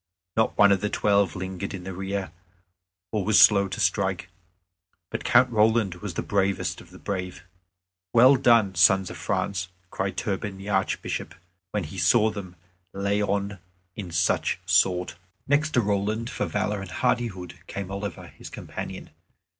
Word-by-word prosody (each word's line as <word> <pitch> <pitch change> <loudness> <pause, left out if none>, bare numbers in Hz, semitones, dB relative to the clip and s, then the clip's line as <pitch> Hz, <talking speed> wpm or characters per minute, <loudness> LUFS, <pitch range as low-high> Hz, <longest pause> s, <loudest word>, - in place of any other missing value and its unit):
Not 110 - +1
one 100 -1 +6
of 100 - +2
the 105 - 0
Twelve 100 -5 +2
lingered 95 +1 -5
in 90 - -8
the 95 +1 -6
rear, 95 -1 -4 0.8
or 105 -3 -1
was 110 +2 +4
slow 100 -2 +6
to 95 - -6
strike, 95 -2 0 0.8
but - - -4
Count 125 +1 +4
Roland 110 -3 +3
was 100 -5 -5
the - - -2
bravest 100 -1 -1
of - - -16
the - - -14
brave. 90 -2 -5 0.7
"Well 125 +4 +7
done, 115 -6 +4
sons 95 +2 +4
of - - -8
France!" 90 -2 -2 0.2
cried 95 0 -3
Turpin 100 -2 -3
the 95 +1 -8
Archbishop, 85 -4 -2 0.3
when 105 -1 -2
he 80 +4 -7
saw 110 +6 +4
them 95 -4 -8 0.4
lay 100 +1 0
on 100 -1 -1 0.4
in 100 -4 -6
such 85 0 +1
sort. 90 -2 +2 0.3
Next 145 +2 +2
to 120 - +5
Roland 105 +3 -1
for - - -2
valor 105 -1 -1
and 95 - -8
hardihood 90 -1 -2
came 100 -1 -6
Oliver, 100 +1 -5
his - - -12
companion. - - -7
100 Hz, 160 wpm, -25 LUFS, 95-105 Hz, 0.8 s, Well